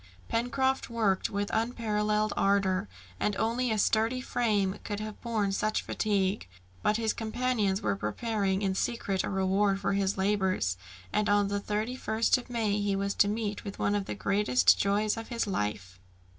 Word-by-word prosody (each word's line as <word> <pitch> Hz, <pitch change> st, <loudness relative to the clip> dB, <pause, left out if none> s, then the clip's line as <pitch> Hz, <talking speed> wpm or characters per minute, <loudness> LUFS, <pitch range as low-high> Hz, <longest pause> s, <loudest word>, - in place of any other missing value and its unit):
Pencroft 260 Hz, +3 st, 0 dB
worked 220 Hz, -5 st, +1 dB
with 200 Hz, 0 st, -2 dB
unparalleled 215 Hz, -2 st, 0 dB
ardour, 195 Hz, -, +1 dB, 0.3 s
and 210 Hz, -, 0 dB
only 235 Hz, +4 st, 0 dB
a 220 Hz, -, +1 dB
sturdy 225 Hz, +4 st, +2 dB
frame 210 Hz, -6 st, 0 dB
could 205 Hz, -1 st, -4 dB
have 215 Hz, -1 st, -7 dB
borne 220 Hz, -4 st, 0 dB
such 215 Hz, +2 st, 0 dB
fatigue; 195 Hz, -, 0 dB, 0.3 s
but 210 Hz, -, +2 dB
his 225 Hz, -1 st, 0 dB
companions 220 Hz, -3 st, -1 dB
were 100 Hz, -2 st, +1 dB
preparing 195 Hz, -, -1 dB
in 190 Hz, -1 st, +1 dB
secret 195 Hz, -2 st, -1 dB
a -, -, -2 dB
reward 195 Hz, +1 st, +1 dB
for 195 Hz, -, 0 dB
his 195 Hz, 0 st, 0 dB
labours, 190 Hz, -, +1 dB, 0.4 s
and 210 Hz, -, +1 dB
on 205 Hz, -1 st, +3 dB
the 205 Hz, 0 st, -1 dB
31st 220 Hz, +3 st, 0 dB
of 245 Hz, -, -12 dB
May 220 Hz, -4 st, 0 dB
he 200 Hz, -1 st, 0 dB
was 200 Hz, +1 st, -1 dB
to 200 Hz, -, +4 dB
meet 210 Hz, -1 st, -2 dB
with 200 Hz, -2 st, -7 dB
one 205 Hz, -, +1 dB
of 205 Hz, -1 st, 0 dB
the -, -, -4 dB
greatest 205 Hz, +5 st, +3 dB
joy's 205 Hz, +2 st, +1 dB
of 225 Hz, -, -6 dB
his 235 Hz, -1 st, -1 dB
life. 105 Hz, -, -3 dB
205 Hz, 170 wpm, -29 LUFS, 195-225 Hz, 0.4 s, to